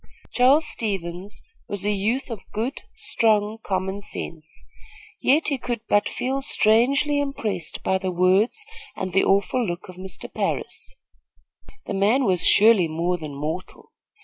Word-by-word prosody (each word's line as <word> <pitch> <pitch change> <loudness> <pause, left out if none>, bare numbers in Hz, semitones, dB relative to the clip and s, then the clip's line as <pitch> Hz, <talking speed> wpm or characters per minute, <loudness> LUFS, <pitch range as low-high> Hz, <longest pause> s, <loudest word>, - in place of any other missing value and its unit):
Charles 275 +5 +4
Stevens 195 -2 -3 0.2
was 200 -1 -3
a 210 - +2
youth 220 +7 -1
of 220 -4 -5
good 235 +6 -3
strong, 215 -1 +1
common 190 0 -2
sense; 160 -5 -5 0.6
yet 300 +4 +3
he 280 -3 -1
could 240 -3 -3
but 205 0 +2
feel 265 +2 -2
strangely 275 +4 +3
impressed 215 - -2
by 190 - +1
the 190 0 -2
words 190 - +2 0.3
and 185 -2 -4
the 190 - +4
awful 200 +6 +2
look 175 -4 -4
of 180 - -11
Mr. 185 0 -8
Parris. - - -2 0.9
The - - -4
man 215 +7 +2
was 185 -4 +2
surely 210 -4 +6
more 170 +3 -1
than 150 -3 -7
mortal. 155 +6 -6
205 Hz, 145 wpm, -23 LUFS, 185-245 Hz, 0.9 s, surely